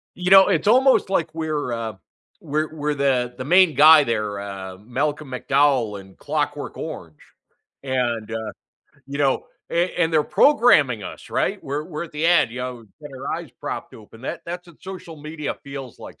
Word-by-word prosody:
You 180 0 -2
know, 195 0 +9
it's 180 0 +1
almost 255 -3 +4
like 170 -5 0
we're, 155 -5 -2
uh, 115 -1 -3 0.5
we're 155 +1 -2
we're 150 -1 -2
the 130 -3 0
the 130 - -6
main 180 +1 +5
guy 155 0 +8
there, 105 -4 -2
uh, 95 -2 -7
Malcolm 140 +7 -3
McDowell 130 -5 +1
in 95 0 -16
Clockwork 145 -1 -3
Orange, 85 - -8 0.6
and, 120 -5 -1
uh, 110 -2 -4 0.5
you 140 +1 -6
know, 140 -2 +1 0.2
an 170 +2 +1
and 165 -1 +2
they're 155 -1 +4
programming 155 - +4
us, - - -9
right, - - -1
we're 145 +3 -3
we're 150 - -6
at 170 - -12
the 150 +2 -1
end, 170 -8 +4
you 125 - -7
know, 125 0 -4 0.2
we've 145 - -9
got 130 - -10
our 135 - -3
eyes - - -8
propped - - -6
open, 110 +1 -15
that - - -5
that's 175 +1 -6
what 170 -3 -19
social 185 -4 -9
media 150 0 -5
feels 140 -3 -8
like - - -11
145 Hz, 185 wpm, -22 LUFS, 120-160 Hz, 0.6 s, know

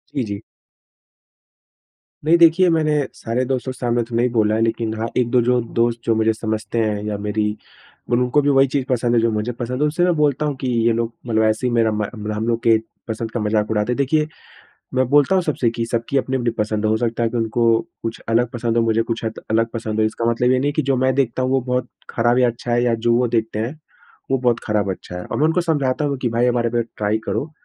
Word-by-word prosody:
जी, 135 - 0
जी। 100 -1 -5 1.8
नहीं 165 +2 +5
देखिए, 170 +2 +5
मैंने 155 -2 +2 0.2
सारे 120 +3 -2
दोस्तों 130 0 -2
के 130 - -10
सामने 120 -1 0
तो 115 +1 -7
नहीं 120 +2 +2
बोला 110 -2 +2
है 110 - 0
लेकिन 115 -1 0
हाँ, 115 - -1
1-2 125 0 +3
जो 125 +1 +2 0.2
दोस्त 115 0 +2
जो 115 - +2
मुझे 110 0 +2
समझते 110 0 -3
हैं 105 -2 0
या 105 -1 -2
मेरी 105 +1 -1 0.7
मतलब 125 +1 +3
उनको 125 +4 +2
भी 145 - +1
वही 135 0 +5
चीज़ 135 0 -1
पसंद 120 -1 +1
है 115 - +4
जो 115 0 +2
मुझे 110 +3 -2
पसंद 120 +1 -4
है। - - +4
उनसे 155 +4 0
मैं 180 0 +3
बोलता 150 -1 +1
हूँ 145 -2 -1
कि 130 - -2 0.2
ये - - +4
लोग 115 0 -2
मतलब 110 -1 +2
ऐसे 110 +3 +1
ही - - -1
मेरा 115 -2 +3
म 105 0 -2
मतलब 105 0 -4
हम 110 +2 -2
लोग 115 -1 +1
के 115 -1 +5 0.3
पसंद 110 0 -4
का 120 - -3
मज़ाक 105 0 0
उड़ाते 105 +2 0
हैं 125 - -1
देखिए, 150 +3 +1 0.7
मैं 130 -1 +2
बोलता 145 +5 +4
हूँ 185 - +3
सबसे 140 -7 0
कि 115 0 -3
सबकी 115 +3 -2
अपनी-अपनी 130 -2 -1
पसंद 105 0 -1
है, 110 - +2
हो 110 - +2
सकता 115 +1 -1
है 115 - +2
कि 120 - -5
उनको 115 0 +2 0.2
कुछ 115 0 -4
अलग 115 +1 +2
पसंद 120 -1 -2
हो, 115 - +4
मुझे 115 0 +2
कुछ 115 0 -3
शायद 110 -1 -4
अलग 115 +1 +3
पसंद 110 -2 -4
हो। - - +4
इसका 115 +1 -3
मतलब 125 +2 +1
ये 130 - +3
नहीं 140 +3 0
है - - 0
कि 155 - 0
जो 135 -1 +1
मैं 130 +1 +2
देखता 130 -1 0
हूँ 130 - 0
वो 135 0 +2
बहुत 125 0 -2 0.2
ख़राब 120 +1 +2
या 125 -1 +4
अच्छा 120 +1 -4
है 120 0 +2
या 120 -1 +2
जो 115 +1 +1
वो 125 +1 +3
देखते 115 -2 -1
हैं, 120 +8 -3 0.5
वो 135 - +2
बहुत 120 -2 +1
ख़राब, 105 -2 0
अच्छा 90 -1 -7
है। 90 - -7
और - - -4
मैं 150 - +2
उनको 160 +3 +2
समझाता 150 -5 0
हूँ 140 -1 0
कि 125 - +1
भाई 120 +1 +1
हमारे 120 -1 +1
पे 120 0 +1
ट्राई 105 +1 0
करो 110 +10 -2
120 Hz, 255 wpm, -20 LUFS, 110-130 Hz, 1.8 s, नहीं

